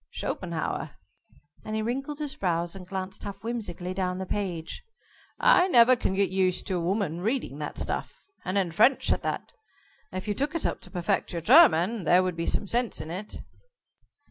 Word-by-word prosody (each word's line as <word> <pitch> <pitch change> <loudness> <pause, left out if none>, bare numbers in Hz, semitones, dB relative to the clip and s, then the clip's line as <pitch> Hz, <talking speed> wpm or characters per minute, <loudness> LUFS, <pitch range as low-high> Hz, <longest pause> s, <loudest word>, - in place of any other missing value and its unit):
"Schopenhauer," - - -4 0.7
and 215 - -4
he 220 - -1
wrinkled 270 +5 -3
his 295 -2 -3
brows 175 -1 -1
and 185 -2 -10
glanced 190 +1 -5
half 200 0 -7
whimsically 205 -6 -4
down 185 -1 -2
the 190 - -4
page. 180 -5 -4 0.6
"I 480 -7 +5
never 250 -6 +7
can 190 -5 -1
get 195 0 +1
used 185 -1 +1
to 185 - -1
a 170 - -2
woman 175 -2 -1
reading 220 - -2
that 150 - -5
stuff - - -4 0.2
and 185 +1 -1
in 185 -4 +1
French, 240 +10 +4
at - - +1
that. - - -3 0.6
If 185 +2 -5
you 205 - +1
took 285 +8 -2
it 335 - -2
up - - -1
to - - -14
perfect 185 +1 -1
your 170 - -3
German 230 - +6
there 180 +3 +5
would 185 -2 -2
be 165 0 -3
some - - +1
sense 240 +3 0
in 155 +1 -6
it." 195 +5 -6
195 Hz, 190 wpm, -27 LUFS, 180-235 Hz, 0.7 s, never